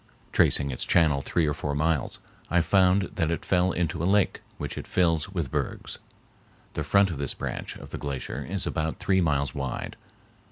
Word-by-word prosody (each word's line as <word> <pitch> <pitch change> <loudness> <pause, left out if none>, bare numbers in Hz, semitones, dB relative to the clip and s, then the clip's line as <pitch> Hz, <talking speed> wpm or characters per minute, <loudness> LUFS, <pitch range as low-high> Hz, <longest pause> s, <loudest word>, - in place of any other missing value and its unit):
Tracing 70 -1 +3
its 60 - -3
channel 75 -5 +3
three 80 +4 +1
or 75 - +1
four 70 0 -3
miles, 80 -1 0 0.3
I 90 - +4
found 95 +3 +4
that 80 -4 0
it 85 -3 -2
fell 90 0 +3
into 85 -1 -1
a - - 0
lake, 100 -1 +2 0.2
which - - -4
it - - -6
fills 85 -2 +2
with 85 -9 -3
bergs. - - -3 0.7
The - - -2
front 100 -2 +4
of 75 - -5
this 70 -2 -2
branch - - -4
of - - -11
the - - -5
glacier 70 -1 -4
is 95 +4 -2
about 80 -1 -2
three 95 -2 +2
miles 70 -5 +1
wide. 70 -3 -4
80 Hz, 190 wpm, -27 LUFS, 70-90 Hz, 0.7 s, I